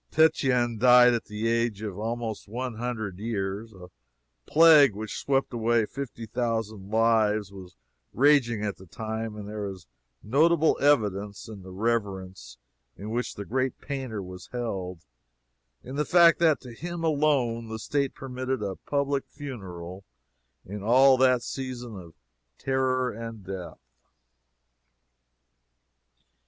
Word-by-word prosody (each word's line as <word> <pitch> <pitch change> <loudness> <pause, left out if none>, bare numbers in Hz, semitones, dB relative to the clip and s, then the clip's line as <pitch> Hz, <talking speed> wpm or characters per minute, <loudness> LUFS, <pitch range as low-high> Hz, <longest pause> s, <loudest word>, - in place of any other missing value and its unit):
Titian 125 -7 +2
died 125 0 +7
at 115 - -2
the 105 +2 -3
age 115 -2 0
of 100 -2 -5
almost 115 -1 -4
one 120 +2 -5
hundred 110 -6 -4
years. 105 0 -3
A 90 -3 -13 0.6
plague 150 -7 +7
which 110 0 -5
swept 135 -2 0
away 115 -1 +2
fifty 120 -2 -7
thousand 110 -3 -3
lives 110 -2 +2
was 95 -3 -12 0.4
raging 125 -6 +3
at 100 - -3
the 95 - -14
time, 110 +2 -5
and 105 -1 -8
there 105 -1 -4
is 95 -3 -8 0.4
notable 160 +7 +3
evidence 105 -8 +1
of 105 -3 -9
the 95 - -11
reverence 95 - -3 0.4
in 105 +2 -7
which 120 +2 -2
the 100 - -6
great 130 +3 -1
painter 130 -8 -5
was 90 0 -10
held, 95 -8 -4 0.8
in 130 +3 -7
the 150 - +2
fact 170 0 +5
that 160 -4 +4
to 125 -2 -10
him 170 +6 -6
alone 140 -7 +1
the 110 0 -5
state 140 +4 -1
permitted 130 -2 -4
a 95 -2 -4
public 140 -1 0
funeral 95 - -8 0.6
in 100 +2 -7
all 130 +5 +6
that 130 -2 +3
season 125 -3 -6
of 85 -4 -11 0.4
terror 130 -1 0
and 115 -1 -8
death. 95 -2 -7
115 Hz, 135 wpm, -27 LUFS, 105-130 Hz, 0.8 s, died